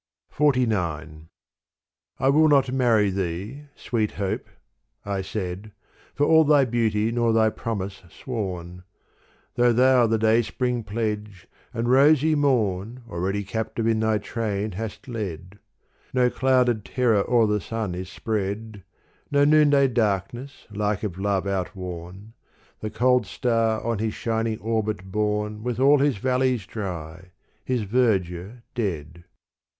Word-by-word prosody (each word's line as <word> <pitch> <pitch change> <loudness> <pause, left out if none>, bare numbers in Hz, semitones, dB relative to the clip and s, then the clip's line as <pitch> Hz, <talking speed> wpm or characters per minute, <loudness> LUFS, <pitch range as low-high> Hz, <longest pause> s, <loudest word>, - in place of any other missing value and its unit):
XLIX 90 - 0 0.9
I 135 - +2
WILL 155 +3 +5
not 140 -4 +3
marry 115 -6 +3
thee, 95 - -4
sweet 110 -3 -2
Hope 100 -2 -3 0.3
— - - -47
I 95 - -1
said 95 +1 -5 0.2
— - - -31
For 145 - +2
all 160 +1 +6
thy 145 -2 +4
beauty 110 -2 0
nor 120 -1 +1
thy 110 -1 +3
promise 100 -4 -5
sworn: 90 -7 -5 0.7
Though 120 0 +3
thou 125 0 +4
the 115 0 +1
dayspring 115 +2 +1
pledge, 105 -2 -4 0.3
and 115 +1 -2
rosy 145 +4 +5
morn 120 -5 0
Already 95 +4 -2
captive 110 +2 -3
in 115 -1 +2
thy 110 -1 +2
train 105 -1 -3
hast 110 +7 -6
led. 100 -5 -6 0.6
No 125 -1 +3
clouded 125 -4 +2
terror 115 -6 +1
o'er 120 -2 +4
the 105 -1 0
sun 110 -5 -3
is 90 +1 -6
spread, 105 0 -4 0.5
No 145 0 +3
noonday 145 -2 +5
darkness 120 +3 -2
like 105 -1 -1
of 95 -4 -4
love 100 -1 0
outworn: 95 +1 -5 0.5
The 110 - -4
cold 125 +1 +2
star 115 0 0
on 115 -3 -1
his 110 0 -2
shining 115 -1 -1
orbit 110 -3 -2
borne 105 +1 -1
With 125 +1 -3
all 140 +2 +5
his 140 -4 +2
valleys 125 -1 0
dry, 90 -4 -6 0.3
his 125 -2 -1
verdure 100 -1 0
dead. 85 - -4
110 Hz, 135 wpm, -24 LUFS, 100-125 Hz, 0.9 s, all